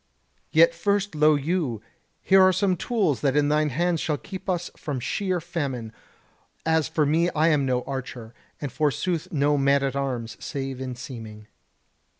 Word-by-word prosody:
Yet -, -, +5 dB
first 205 Hz, -, 0 dB
lo 155 Hz, 0 st, +4 dB
you, 145 Hz, -, -1 dB, 0.4 s
here 190 Hz, 0 st, +6 dB
are 185 Hz, 0 st, +6 dB
some 185 Hz, 0 st, +1 dB
tools 185 Hz, -, 0 dB
that 140 Hz, 0 st, +1 dB
in 145 Hz, 0 st, +3 dB
thine 150 Hz, 0 st, +2 dB
hands 170 Hz, +4 st, 0 dB
shall 150 Hz, -2 st, -1 dB
keep 190 Hz, +5 st, -8 dB
us 175 Hz, -1 st, -1 dB
from 145 Hz, -4 st, -4 dB
sheer 185 Hz, -, -1 dB
famine: 140 Hz, -9 st, -4 dB, 0.7 s
as 160 Hz, -1 st, +2 dB
for 160 Hz, -1 st, +1 dB
me 165 Hz, +4 st, +2 dB
I 155 Hz, +2 st, +4 dB
am 145 Hz, -4 st, +2 dB
no 125 Hz, -1 st, 0 dB
archer; 125 Hz, -4 st, -6 dB, 0.3 s
and 145 Hz, -3 st, -4 dB
forsooth 150 Hz, +4 st, -1 dB
no 145 Hz, -1 st, +2 dB
man 140 Hz, 0 st, +3 dB
at 135 Hz, -1 st, -1 dB
arms 125 Hz, -5 st, -3 dB
save 135 Hz, -2 st, -4 dB
in 130 Hz, -1 st, -4 dB
seeming." 115 Hz, -4 st, -9 dB
150 Hz, 165 wpm, -25 LUFS, 135-175 Hz, 0.7 s, here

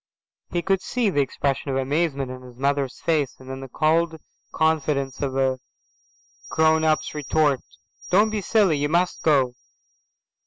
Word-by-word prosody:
He 175 Hz, -1 st, -2 dB
could 195 Hz, -1 st, +1 dB
see 240 Hz, -5 st, 0 dB
the 145 Hz, -, +2 dB
expression 140 Hz, +1 st, -2 dB
of 135 Hz, -, 0 dB
amazement 140 Hz, -1 st, -1 dB
on 130 Hz, 0 st, -8 dB
his 125 Hz, -1 st, -14 dB
mother's 140 Hz, -1 st, -1 dB
face, 150 Hz, -5 st, 0 dB
and 130 Hz, -, -14 dB
then 130 Hz, 0 st, -6 dB
the 135 Hz, -, -7 dB
cold 160 Hz, +4 st, +1 dB, 0.3 s
confidence 150 Hz, -4 st, 0 dB
of 135 Hz, -2 st, -2 dB
a 130 Hz, -1 st, +1 dB, 0.9 s
grown 160 Hz, 0 st, +3 dB
up's 155 Hz, -1 st, +1 dB
retort. 150 Hz, -2 st, +1 dB, 0.5 s
"Don't 210 Hz, +4 st, +4 dB
be 215 Hz, -1 st, -2 dB
silly. 195 Hz, -6 st, +3 dB
You 145 Hz, +1 st, 0 dB
must 175 Hz, +3 st, +1 dB
go. 135 Hz, -5 st, +3 dB
150 Hz, 155 wpm, -24 LUFS, 135-165 Hz, 0.9 s, Don't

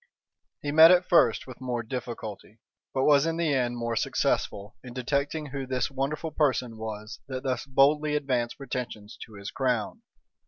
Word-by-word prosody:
He 145 Hz, -, -1 dB
met 160 Hz, +2 st, +9 dB
at 180 Hz, 0 st, +5 dB
first 120 Hz, -9 st, +4 dB
with 130 Hz, -1 st, -11 dB
more 125 Hz, -2 st, -2 dB
difficulty, 115 Hz, -3 st, -7 dB, 0.3 s
but 130 Hz, -, 0 dB
was 145 Hz, +1 st, +5 dB
in 165 Hz, 0 st, -1 dB
the 165 Hz, -3 st, +1 dB
end 120 Hz, -2 st, 0 dB
more 115 Hz, -1 st, -2 dB
successful, 100 Hz, -1 st, -1 dB
in 125 Hz, -1 st, -10 dB
detecting 140 Hz, +4 st, -1 dB
who 135 Hz, -1 st, -4 dB
this 130 Hz, +2 st, -1 dB
wonderful 145 Hz, +4 st, -2 dB
person 130 Hz, -7 st, 0 dB
was 110 Hz, 0 st, -6 dB
that 130 Hz, -2 st, -5 dB
thus 130 Hz, 0 st, -2 dB
boldly 150 Hz, +3 st, +3 dB
advanced 125 Hz, -5 st, -1 dB
pretensions 125 Hz, -6 st, -6 dB
to 110 Hz, -, -16 dB
his 100 Hz, 0 st, -7 dB
crown. 130 Hz, -, -1 dB
130 Hz, 165 wpm, -27 LUFS, 120-145 Hz, 0.3 s, met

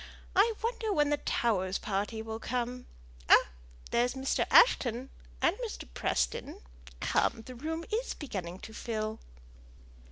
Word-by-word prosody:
I 425 Hz, +5 st, +5 dB
wonder 455 Hz, -2 st, -1 dB
when 295 Hz, -5 st, +2 dB
the 295 Hz, -, +3 dB
Towers' 195 Hz, -9 st, 0 dB
party 210 Hz, +2 st, -2 dB
will 220 Hz, 0 st, -5 dB
come. 250 Hz, +1 st, -3 dB, 0.4 s
Ah! -, -, +7 dB, 0.4 s
there's 245 Hz, +2 st, +2 dB
Mr. 265 Hz, 0 st, 0 dB
Ashton, 260 Hz, -, +5 dB, 0.3 s
and -, -, +4 dB
Mr. 60 Hz, -, -5 dB
Preston. -, -, -1 dB, 0.4 s
Come, 225 Hz, -, +1 dB
the 255 Hz, -, -8 dB
room 320 Hz, +6 st, -4 dB
is 475 Hz, +3 st, -1 dB
beginning 190 Hz, -, -5 dB
to 220 Hz, -, -9 dB
fill." 220 Hz, -1 st, -3 dB
240 Hz, 130 wpm, -31 LUFS, 215-295 Hz, 0.4 s, Ah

